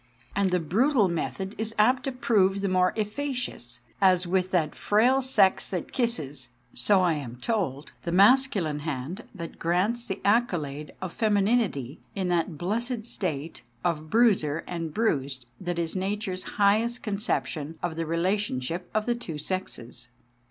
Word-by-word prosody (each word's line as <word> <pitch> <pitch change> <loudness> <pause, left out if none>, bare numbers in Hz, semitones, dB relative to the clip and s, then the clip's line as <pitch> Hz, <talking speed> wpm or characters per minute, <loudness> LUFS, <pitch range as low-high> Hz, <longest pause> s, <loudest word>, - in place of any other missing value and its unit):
And 200 -1 +2
the 180 0 +2
brutal 215 - +3
method 190 +3 -3
is 220 +1 -1
apt 250 +5 +4
to 270 - -1
prove 200 -6 +2
the 200 - 0
more 185 -1 +3
efficacious, 220 - -3 0.2
as 185 -2 +5
with 185 +1 +1
that 165 -5 +1
frail 245 +6 +3
sex 215 -8 +3
that 180 -4 -4
kisses, 150 - -2 0.2
so 200 -2 +3
I 175 -2 +3
am 135 -6 -5
told, 155 - -2
the 170 - -3
masculine 200 - +4
hand 150 - -4
that 170 -3 -7
grants 205 +8 0
the 195 -2 -3
accolade 165 - +1
of 185 - -4
femininity 205 - +1 0.2
in 190 -2 -1
that 170 -2 0
blessed 225 - -2
state 165 -9 -4 0.2
of 155 -2 -1
bruiser 190 -9 +3
and 165 -2 -4
bruised 140 - -1
that 175 -2 -3
is 170 0 -1
Nature's 190 0 -2
highest 220 +4 +3
conception 190 -7 -2
of 175 -2 -1
the 165 -1 -3
relationship 170 -2 -1
of 215 0 +1
the 240 - +2
two 180 -10 -6
sexes. 130 -8 -4
185 Hz, 150 wpm, -27 LUFS, 160-215 Hz, 0.2 s, as